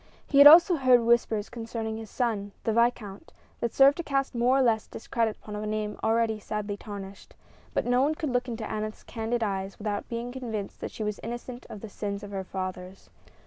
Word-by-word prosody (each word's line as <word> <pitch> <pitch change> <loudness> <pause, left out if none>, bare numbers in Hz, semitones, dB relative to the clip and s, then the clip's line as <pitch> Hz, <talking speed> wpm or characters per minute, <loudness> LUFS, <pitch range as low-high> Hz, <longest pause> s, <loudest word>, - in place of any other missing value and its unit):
He 280 - +2
had 285 - +12
also 340 +3 +8
heard 255 -3 +5
whispers 230 -2 +2
concerning 225 -1 -5
his 220 -1 -8
son, 210 -5 -2
the 225 - 0
viscount, 235 0 0 0.3
that 235 - -1
served 275 +1 +5
to 340 - -3
cast 275 -2 -1
more 245 +2 +3
or - - +4
less 225 -3 +1
discredit 225 -1 -2
upon 210 - -9
a 210 - -4
name 210 0 -3
already 225 -1 +1
sadly 210 0 -4
tarnished; 200 -2 -9 0.4
but - - +1
no 245 +1 +3
one 300 +3 +2
could 310 -4 -3
look 245 +1 0
into 230 -2 -4
Aneth's 215 0 -5
candid 230 +1 -2
eyes 195 -2 -3
without 205 -1 -4
being 235 +1 -4
convinced 225 -6 -5
that - - -4
she 220 - -6
was 210 -1 -3
innocent 240 +2 -7
of 205 - -9
the 220 - -7
sins 200 0 -5
of 205 - -8
her 195 -1 -3
fathers. 185 0 -7
225 Hz, 205 wpm, -27 LUFS, 210-245 Hz, 0.4 s, had